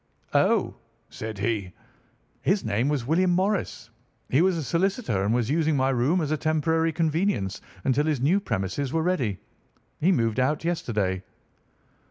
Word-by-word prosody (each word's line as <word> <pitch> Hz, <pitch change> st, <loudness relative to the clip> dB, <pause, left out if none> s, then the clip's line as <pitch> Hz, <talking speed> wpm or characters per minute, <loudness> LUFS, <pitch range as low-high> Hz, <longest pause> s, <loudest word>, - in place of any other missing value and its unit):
"'Oh,' -, -, +3 dB, 0.4 s
said 110 Hz, -1 st, -6 dB
he, 100 Hz, -3 st, -2 dB, 0.7 s
'his 190 Hz, -, +1 dB
name 110 Hz, +5 st, +1 dB
was 140 Hz, -5 st, -1 dB
William 175 Hz, +6 st, +2 dB
Morris. 185 Hz, -, -1 dB, 0.4 s
He 135 Hz, -, +4 dB
was 185 Hz, -1 st, +3 dB
a 160 Hz, -, -2 dB
solicitor 175 Hz, -, 0 dB
and 100 Hz, -, +1 dB
was 120 Hz, +1 st, +1 dB
using 155 Hz, -1 st, +2 dB
my 130 Hz, 0 st, +2 dB
room 135 Hz, +8 st, +2 dB
as 150 Hz, -2 st, -2 dB
a 155 Hz, -, +1 dB
temporary 160 Hz, +1 st, +1 dB
convenience 160 Hz, -, 0 dB, 0.2 s
until 135 Hz, +3 st, +2 dB
his 150 Hz, -4 st, +1 dB
new 160 Hz, +10 st, +3 dB
premises 115 Hz, -, -2 dB
were 165 Hz, -1 st, 0 dB
ready. 135 Hz, -, 0 dB, 0.6 s
He 180 Hz, +5 st, +3 dB
moved 115 Hz, -, +1 dB
out 150 Hz, +5 st, 0 dB
yesterday. 105 Hz, -, -1 dB
145 Hz, 155 wpm, -26 LUFS, 115-165 Hz, 0.7 s, He